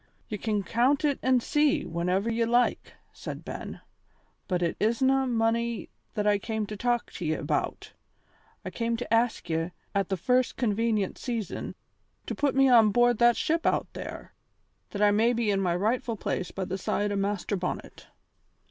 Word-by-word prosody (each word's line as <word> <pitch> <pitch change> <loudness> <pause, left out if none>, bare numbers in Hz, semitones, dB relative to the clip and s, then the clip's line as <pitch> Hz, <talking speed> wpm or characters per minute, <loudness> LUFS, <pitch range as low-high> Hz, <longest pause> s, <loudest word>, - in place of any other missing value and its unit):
"Ye 210 -3 -4
can 210 -1 -1
count 255 - +2
it 285 -2 +1
an' 255 -1 +3
see, 295 +3 +2
whenever 180 +5 -1
ye 230 0 +1
like," 240 +1 +1 0.2
said - - -7
Ben. - - -7 0.7
"But 180 -2 0
it 170 - 0
isna 265 +5 +2
money 230 -2 0 0.2
that 210 -2 -1
I 205 -1 +3
came 220 +1 -2
to 210 - -6
talk 240 +2 -1
to - - -6
ye 155 0 +1
about. - - -3 0.7
I - - -4
came 230 0 -1
to 235 -1 -3
ask 230 -4 +1
ye, 165 0 -1 0.2
at 200 -1 0
the 190 - 0
first 250 +7 +1
convenient 220 -3 0
season, 230 -5 -4 0.5
to - - -3
put 285 -2 0
me 270 0 +5
on 230 -4 +6
board 240 0 +3
that 240 0 +5
ship 330 +1 0
out - - 0
there, - - -8 0.6
that 205 0 -1
I 205 - +6
may 225 +4 +3
be 230 -3 +1
in 195 -1 +1
my 175 -2 +1
rightful 225 +4 0
place 185 -2 -2
by 190 - -4
the 190 +2 -4
side 205 +2 -1
o' - - -1
Master 200 0 -1
Bonnet." 180 -1 -5
225 Hz, 180 wpm, -28 LUFS, 200-245 Hz, 0.7 s, on